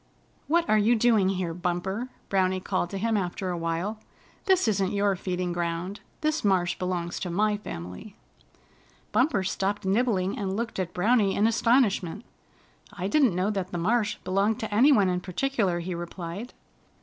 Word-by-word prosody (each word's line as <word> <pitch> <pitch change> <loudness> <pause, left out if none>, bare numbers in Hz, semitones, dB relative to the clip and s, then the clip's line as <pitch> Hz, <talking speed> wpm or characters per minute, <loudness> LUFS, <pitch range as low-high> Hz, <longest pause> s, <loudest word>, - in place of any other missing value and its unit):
"What 335 +2 +2
are 215 - +4
you 225 +4 +4
doing 220 -4 +3
here, 185 -3 -2
Bumper?" 180 +7 -2 0.2
Browny 185 -1 +1
called 185 -2 -1
to 195 - -4
him 225 +3 0
after 185 -1 -2
a 175 - -2
while. 165 +6 -2 0.5
"This 375 -8 +4
isn't 195 -3 +1
your 200 -1 +2
feeding 180 -1 -3
ground. 175 +3 -3 0.2
This 310 0 0
marsh 185 -3 +2
belongs 180 -2 -2
to 180 - -4
my 210 +4 +1
family." 90 - -8 1.0
Bumper 230 -3 +2
stopped 195 +2 -2
nibbling 200 0 +1
and 195 -1 -2
looked 230 -3 -3
at 180 -2 -2
Browny 205 +1 +3
in 210 - +3
astonishment. 225 -4 +2 0.7
"I 195 -2 -4
didn't 255 - +3
know 185 +4 +1
that 190 -3 -3
the 175 - -3
marsh 215 +4 +1
belonged 200 +5 +1
to 220 -2 -4
any 255 +8 +6
one 205 -8 +5
in 180 -1 0
particular," 190 -2 -1
he 180 +2 -4
replied. 175 +6 -6
195 Hz, 165 wpm, -27 LUFS, 180-220 Hz, 1.0 s, any